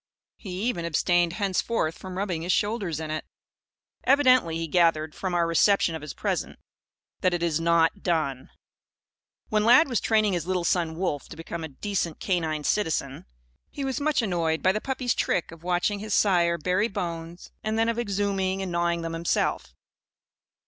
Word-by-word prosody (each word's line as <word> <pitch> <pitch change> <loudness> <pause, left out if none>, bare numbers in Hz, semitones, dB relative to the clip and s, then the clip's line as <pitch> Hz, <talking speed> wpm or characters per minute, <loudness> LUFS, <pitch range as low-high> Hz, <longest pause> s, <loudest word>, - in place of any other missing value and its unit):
He 190 -1 -6
even 225 -8 -1
abstained 170 +1 +2
henceforth 195 -3 -1
from 185 -1 -8
rubbing 185 -5 -2
his 175 +2 -1
shoulders 205 -6 0
in 155 -1 -5
it. 155 - -3 0.8
Evidently 255 - +4
he 165 - -2
gathered, 160 -2 +2
from 185 -2 -3
our 170 -1 +3
reception 165 +1 +3
of 160 - -5
his 150 -1 -7
present, - - -2 0.6
that 185 -1 +2
"it 170 - -3
is 165 -2 +1
not 170 +3 +2
done." 155 -7 -1 1.0
When 215 -1 +2
Lad 250 +9 +6
was 245 -6 0
training 215 -3 +2
his 175 -1 -2
little 185 -2 0
son, 170 -2 0
Wolf, 165 -5 -2
to 160 - -10
become 165 0 -6
a - - -3
decent 170 +2 -3
canine 160 -5 -1
citizen, 155 -8 -1 0.4
he 280 - -5
was 270 +2 -2
much 300 -4 +1
annoyed 165 -5 0
by 185 - +5
the 215 +2 -2
puppy's 255 -2 -1
trick 175 - -1
of 165 -1 -12
watching 180 +3 0
his 215 0 -2
sire 170 -4 +3
bury 185 +6 +1
bones 170 -4 -6
and 215 +1 -1
then 225 0 +2
of 230 0 -1
exhuming 195 -3 -1
and 185 - -4
gnawing 170 0 0
them 165 0 -4
himself. 165 +1 -1
175 Hz, 175 wpm, -26 LUFS, 165-205 Hz, 1.0 s, Lad